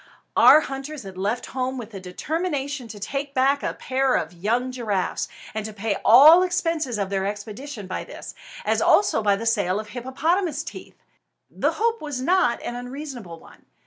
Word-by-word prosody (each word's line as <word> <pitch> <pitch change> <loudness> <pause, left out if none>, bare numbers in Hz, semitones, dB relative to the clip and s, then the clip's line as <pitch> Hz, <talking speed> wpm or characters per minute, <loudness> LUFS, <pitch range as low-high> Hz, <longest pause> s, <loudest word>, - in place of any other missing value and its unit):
Our 310 - +8
hunters 275 0 -6
had 190 -1 -9
left 205 +6 -2
home 260 0 -2
with 230 -3 -7
the 195 - -7
determination 285 - -3
to 215 -2 -9
take 275 +6 -4
back 270 +2 +3
a - - -3
pair 265 0 0
of 160 +2 -2
young 230 +8 -1
giraffes, 215 -7 -2 0.3
and 220 0 -3
to 215 0 -6
pay 205 -1 -2
all 295 +10 +9
expenses 330 - -1
of 200 -1 -2
their 195 0 0
expedition 210 +4 -6
by 185 - -4
this, - - -9 0.3
as - - +1
also 400 - +4
by 205 -2 +3
the 225 +3 -5
sale 205 -4 +1
of 215 -1 -7
hippopotamus 285 - -1
teeth. - - -10 0.5
The - - 0
hope 460 +1 0
was 295 -4 -4
not 340 -3 +2
an 240 - -4
unreasonable 245 - -7
one. - - -18
250 Hz, 175 wpm, -24 LUFS, 210-285 Hz, 0.5 s, all